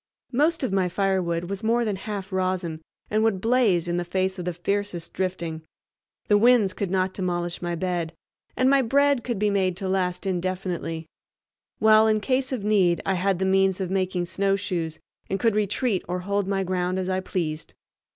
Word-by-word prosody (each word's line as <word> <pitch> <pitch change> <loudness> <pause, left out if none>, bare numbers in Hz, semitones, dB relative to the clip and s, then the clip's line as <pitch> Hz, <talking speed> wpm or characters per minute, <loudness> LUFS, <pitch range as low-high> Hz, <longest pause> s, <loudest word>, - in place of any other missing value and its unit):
Most 300 +5 +2
of 245 - -1
my 185 -2 +2
firewood 185 -3 0
was 190 +2 -5
more 235 +2 +2
than 210 -3 -1
half 200 0 -6
rosin 185 -4 -1 0.3
and 215 +1 +2
would 220 -4 +2
blaze 220 -6 +2
in 175 0 0
the 175 - 0
face 185 +2 -1
of 180 - -4
the 180 - -1
fiercest 180 -1 -3
drifting; 170 -4 -3 0.7
the 205 -1 +4
winds 230 -4 +5
could 200 -1 -3
not 185 0 0
demolish 175 -2 -2
my 175 -1 -2
bed, 175 -2 -2 0.5
and 255 - +3
my 275 0 +5
bread 280 +1 +2
could 240 -3 -2
be 210 +1 +1
made 185 -3 +1
to 190 - -4
last 185 -1 -1
indefinitely; 180 -3 -2 0.7
while 220 0 +6
in 215 -1 +3
case 260 +4 0
of 250 -6 -3
need 190 -5 +3
I 195 - +1
had 190 +1 +1
the 190 - 0
means 190 0 +3
of 185 -1 -3
making 185 -2 0
snowshoes 185 -4 -1 0.3
and 195 - -1
could 225 +2 +2
retreat 210 0 0
or 180 +1 -2
hold 200 +1 -1
my 195 -1 0
ground 185 0 -1
as 185 -1 -2
I 185 0 0
pleased. 165 -4 -4
190 Hz, 190 wpm, -25 LUFS, 180-210 Hz, 0.7 s, while